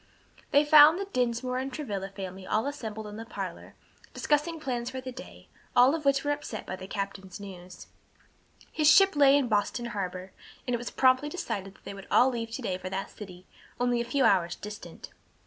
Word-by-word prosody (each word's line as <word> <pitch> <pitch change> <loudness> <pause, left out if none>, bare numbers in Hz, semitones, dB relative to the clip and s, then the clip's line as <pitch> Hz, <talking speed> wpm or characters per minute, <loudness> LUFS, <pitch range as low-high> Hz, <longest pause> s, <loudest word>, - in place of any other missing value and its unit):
They 285 +1 +4
found 300 +2 +8
the 395 - -3
Dinsmore 250 -5 -1
and 265 +1 -4
Travilla 205 -10 -4
family 190 -1 -8
all 220 +3 +1
assembled 220 -7 -5
in 210 0 -8
the 225 - -6
parlor, 190 -5 -7 0.4
discussing 310 +3 0
plans 245 -5 -3
for 260 - -6
the 255 0 -7
day, 260 +2 -12 0.3
all 250 +3 +6
of 320 -2 -3
which 275 0 +3
were 290 - 0
upset 290 -7 -5
by - - -5
the 185 - -9
captain's 200 -1 -5
news. 185 -3 -10 0.9
His 305 -1 +3
ship 390 -1 +6
lay 285 -1 +6
in 275 -3 +1
Boston 215 +2 0
harbor, 185 -1 -4 0.4
and 250 - 0
it 240 - 0
was 240 - -5
promptly 260 +2 +3
decided 200 - -5
that - - -24
they - - -7
would 195 -1 -11
all 255 +2 +5
leave 230 -2 -4
to 260 - -5
day 185 -4 -2
for 185 - -6
that 190 +1 -4
city, 185 -3 -11 0.3
only 245 -1 +1
a - - -1
few 255 +3 0
hours' 180 -3 +3
distant. 210 +1 -9
240 Hz, 200 wpm, -28 LUFS, 195-275 Hz, 0.9 s, found